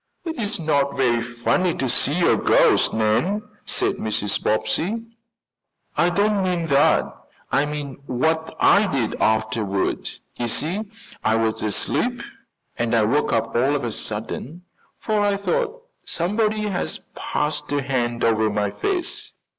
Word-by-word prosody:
"It's 240 Hz, -11 st, -2 dB
not 140 Hz, -4 st, 0 dB
very 120 Hz, -3 st, +2 dB
funny 120 Hz, +9 st, 0 dB
to 135 Hz, -, -1 dB
see 150 Hz, +7 st, +2 dB
a -, -, +5 dB
ghost, -, -, +4 dB
Nan," 115 Hz, -, +1 dB, 0.2 s
said -, -, +1 dB
Mrs. 105 Hz, -2 st, -1 dB
Bobbsey. 185 Hz, -, 0 dB, 0.9 s
"I 175 Hz, -, +3 dB
don't 205 Hz, +3 st, +2 dB
mean 180 Hz, -3 st, 0 dB
that 140 Hz, 0 st, +4 dB, 0.5 s
I 140 Hz, +2 st, +2 dB
mean 145 Hz, -2 st, -5 dB
what 160 Hz, +6 st, 0 dB
I 205 Hz, +1 st, +5 dB
did 135 Hz, -, -1 dB
afterward. 110 Hz, -2 st, 0 dB, 0.3 s
You 120 Hz, -, -1 dB
see 175 Hz, -, -1 dB, 0.4 s
I 110 Hz, -, +3 dB
was 115 Hz, -1 st, 0 dB
asleep 105 Hz, -2 st, 0 dB, 0.6 s
and 120 Hz, 0 st, +1 dB
I 115 Hz, -, +4 dB
woke 125 Hz, +8 st, +1 dB
up 115 Hz, 0 st, 0 dB
all 135 Hz, +5 st, +3 dB
of 140 Hz, -, -2 dB
a 120 Hz, -, -2 dB
sudden, 115 Hz, +11 st, -4 dB, 0.3 s
for 215 Hz, -1 st, -1 dB
I 205 Hz, -1 st, +2 dB
thought 470 Hz, -, -1 dB, 0.2 s
somebody 210 Hz, +5 st, 0 dB
had 200 Hz, -4 st, -1 dB, 0.2 s
passed 150 Hz, 0 st, -2 dB
a 145 Hz, -1 st, 0 dB
hand 120 Hz, -3 st, -1 dB
over 110 Hz, -1 st, +3 dB
my 105 Hz, -1 st, -1 dB
face. 360 Hz, -, -2 dB
140 Hz, 140 wpm, -22 LUFS, 115-185 Hz, 0.9 s, a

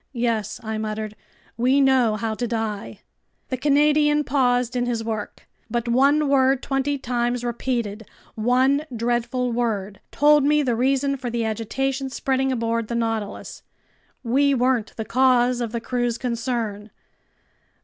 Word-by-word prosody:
"Yes," 230 Hz, -4 st, -1 dB
I 220 Hz, -1 st, -3 dB
muttered, 215 Hz, 0 st, -4 dB, 0.4 s
"we 255 Hz, +4 st, +3 dB
know 260 Hz, -5 st, +3 dB
how 220 Hz, 0 st, -2 dB
to 240 Hz, +2 st, -3 dB
die!" 220 Hz, -3 st, -4 dB, 0.5 s
The 260 Hz, -, -1 dB
Canadian 295 Hz, +2 st, +3 dB
paused 250 Hz, -3 st, +1 dB
in 245 Hz, 0 st, 0 dB
his 230 Hz, -2 st, -1 dB
work. 220 Hz, -2 st, -5 dB, 0.2 s
But 240 Hz, +1 st, -2 dB
one 280 Hz, +5 st, +3 dB
word 270 Hz, -1 st, +3 dB
twenty 275 Hz, +1 st, -1 dB
times 245 Hz, -1 st, -1 dB
repeated, 235 Hz, -3 st, -3 dB, 0.3 s
one 255 Hz, +5 st, +2 dB
dreadful 240 Hz, +2 st, -1 dB
word, 210 Hz, -5 st, -2 dB
told 295 Hz, 0 st, +4 dB
me 300 Hz, +1 st, +3 dB
the 245 Hz, -4 st, 0 dB
reason 275 Hz, +3 st, +1 dB
for 250 Hz, -2 st, -4 dB
the 235 Hz, -1 st, -1 dB
agitation 265 Hz, +5 st, -2 dB
spreading 265 Hz, 0 st, 0 dB
aboard 230 Hz, -2 st, -1 dB
the 235 Hz, -, -3 dB
Nautilus. 225 Hz, -3 st, -3 dB, 0.6 s
We 275 Hz, +4 st, +2 dB
weren't 250 Hz, -3 st, 0 dB
the 220 Hz, -, -4 dB
cause 250 Hz, 0 st, +3 dB
of 230 Hz, -2 st, -3 dB
the 235 Hz, -, -2 dB
crew's 240 Hz, 0 st, -1 dB
concern. 230 Hz, -4 st, -3 dB
245 Hz, 140 wpm, -23 LUFS, 225-265 Hz, 0.6 s, told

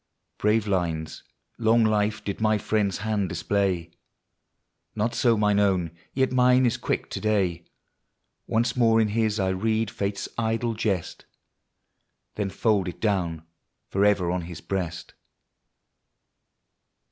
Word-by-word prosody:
in. -, -, -53 dB
Brave 105 Hz, 0 st, +2 dB
lines, 85 Hz, -5 st, -2 dB, 0.4 s
long 115 Hz, 0 st, +4 dB
life, 105 Hz, 0 st, +1 dB
did 100 Hz, +2 st, -4 dB
my 110 Hz, -1 st, +3 dB
friend's 105 Hz, -2 st, 0 dB
hand 105 Hz, -4 st, 0 dB
display. 90 Hz, 0 st, -1 dB, 1.0 s
Not 110 Hz, +2 st, 0 dB
so 120 Hz, -3 st, +3 dB
mine 105 Hz, -1 st, +3 dB
own; 95 Hz, -5 st, +1 dB, 0.2 s
yet 130 Hz, -1 st, +2 dB
mine 125 Hz, 0 st, +4 dB
is 120 Hz, -, +2 dB
quick -, -, -2 dB
to -, -, -3 dB
day. 95 Hz, -6 st, 0 dB, 0.8 s
Once 115 Hz, +1 st, +1 dB
more 115 Hz, -2 st, +4 dB
in 110 Hz, -1 st, +2 dB
his 110 Hz, 0 st, 0 dB
I 95 Hz, -1 st, +1 dB
read 110 Hz, +3 st, 0 dB
Fate's 100 Hz, -1 st, -3 dB
idle 115 Hz, +1 st, 0 dB
jest, 100 Hz, -5 st, -2 dB, 1.1 s
Then 105 Hz, -2 st, -2 dB
fold 100 Hz, 0 st, +1 dB
it 90 Hz, -, -6 dB
down 90 Hz, -7 st, -1 dB, 0.5 s
forever 100 Hz, -3 st, +2 dB
on 90 Hz, 0 st, -1 dB
his 85 Hz, -1 st, -8 dB
breast. 90 Hz, -4 st, -4 dB
105 Hz, 130 wpm, -25 LUFS, 95-110 Hz, 1.1 s, long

